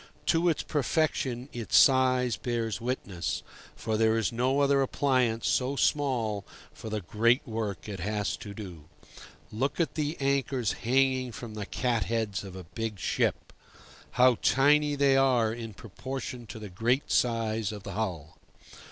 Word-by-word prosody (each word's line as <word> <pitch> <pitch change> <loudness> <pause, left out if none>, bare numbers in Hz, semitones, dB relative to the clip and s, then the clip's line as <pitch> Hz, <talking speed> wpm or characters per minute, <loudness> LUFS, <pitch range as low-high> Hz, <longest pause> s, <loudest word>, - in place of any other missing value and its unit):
To 170 +1 +3
its 160 - 0
perfection 135 -4 -1
its 120 -2 +1
size 130 -3 +4
bears 115 0 -3
witness, 110 -8 -3 0.3
for 110 -1 -2
there 110 0 +3
is 115 - 0
no 130 +4 +1
other 140 -1 +3
appliance 130 -4 +1
so 130 +2 +1
small 120 -9 0 0.3
for 110 - -8
the 105 -1 -2
great 115 - +2
work 110 -4 -4
it 100 -3 -6
has 105 +3 -1
to 100 -1 -9
do. 90 -8 -9 0.7
Look 130 +10 -2
at 170 - +1
the 150 +1 -2
anchors 135 -4 0
hanging 130 +1 +1
from 115 -1 -8
the 105 -2 -5
cat 120 -3 0
heads 110 -4 -2
of 95 -2 -9
a 95 - -7
big 110 +5 -5
ship! - - -1 0.6
How 125 -1 +5
tiny 145 +2 +4
they 140 -1 +4
are 125 -5 +3
in 115 -3 -7
proportion 125 +2 -7
to - - -8
the 105 -2 -8
great 120 +9 0
size 115 -3 +1
of 105 -2 -8
the 100 - -6
hull! 85 -7 -4
115 Hz, 155 wpm, -28 LUFS, 110-135 Hz, 0.7 s, How